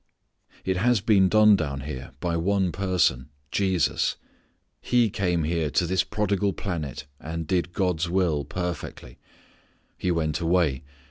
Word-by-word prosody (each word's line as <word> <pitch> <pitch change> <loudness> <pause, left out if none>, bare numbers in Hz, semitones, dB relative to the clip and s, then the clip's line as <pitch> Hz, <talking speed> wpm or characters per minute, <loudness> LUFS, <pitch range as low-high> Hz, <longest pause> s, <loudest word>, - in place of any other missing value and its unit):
It 95 -1 0
has 120 +3 +3
been 100 -2 +4
done 105 0 +6
down 70 -6 -3
here 65 -3 -7
by 85 -2 -1
one 95 +2 +1
person 90 -9 +1 0.2
Jesus. 95 -6 +1 0.7
He 120 -4 +2
came 90 -4 0
here 80 -1 0
to 75 +6 +1
this 95 +2 +1
prodigal 100 -1 0
planet 80 -10 -4
and 80 +1 -5
did 90 +1 0
God's 90 -3 0
will 85 -5 +1
perfectly. 90 -7 -6 0.8
He 90 - -1
went 80 -2 0
away. 85 -6 +1
90 Hz, 135 wpm, -25 LUFS, 80-95 Hz, 0.8 s, done